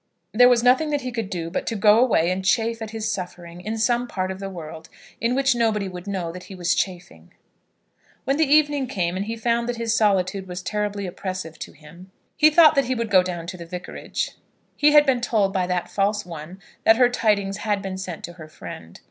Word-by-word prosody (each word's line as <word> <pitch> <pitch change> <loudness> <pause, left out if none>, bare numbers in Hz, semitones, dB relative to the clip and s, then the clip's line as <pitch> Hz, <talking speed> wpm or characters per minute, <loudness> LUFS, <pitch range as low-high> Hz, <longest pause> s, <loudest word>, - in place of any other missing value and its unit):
There 245 +3 +7
was 240 -2 +3
nothing 260 +5 +4
that 290 -1 -1
he 255 -1 -4
could 225 -5 -4
do 170 -3 -4
but - - -3
to 230 - -1
go 210 +1 +5
away 200 -9 +3
and 190 +1 -2
chafe 225 +4 +1
at 220 - -5
his 220 0 -3
suffering 180 -3 -7
in 215 +4 -4
some 240 +2 +1
part 185 -4 -3
of 190 - -7
the 195 0 -5
world 160 -3 -9 0.3
in 235 +2 0
which 270 -1 +3
nobody 220 -4 0
would 180 0 -9
know 185 -4 -3
that 180 +1 -10
he 195 - -10
was 175 -1 0
chafing. 175 - -4 0.9
When 275 +1 0
the 310 -3 +1
evening 295 -3 +3
came, 175 -5 -2
and 195 +2 -2
he 225 - -3
found 235 +1 0
that 245 - -1
his 230 -1 -1
solitude 195 -3 +1
was 180 0 -6
terribly 205 -1 -2
oppressive 180 -3 -6
to - - -8
him, 165 +5 -15 0.3
he 310 0 +6
thought 315 0 +7
that 275 -3 +2
he 255 +1 -1
would 230 -3 -3
go 185 -2 +7
down 175 -2 -5
to 180 +2 -7
the 170 - -9
Vicarage. 180 +1 -5 0.4
He 295 0 +4
had 295 0 +7
been 260 -3 +2
told 210 -5 +1
by 185 -2 0
that 180 -1 -2
false 205 +1 0
one 170 +2 -9 0.2
that 225 - +6
her 250 0 +6
tidings 205 -5 0
had 210 -1 -2
been 190 -1 -5
sent 180 -3 -6
to 175 - -7
her 160 -3 -11
friend. 85 - -10
200 Hz, 230 wpm, -23 LUFS, 180-235 Hz, 0.9 s, There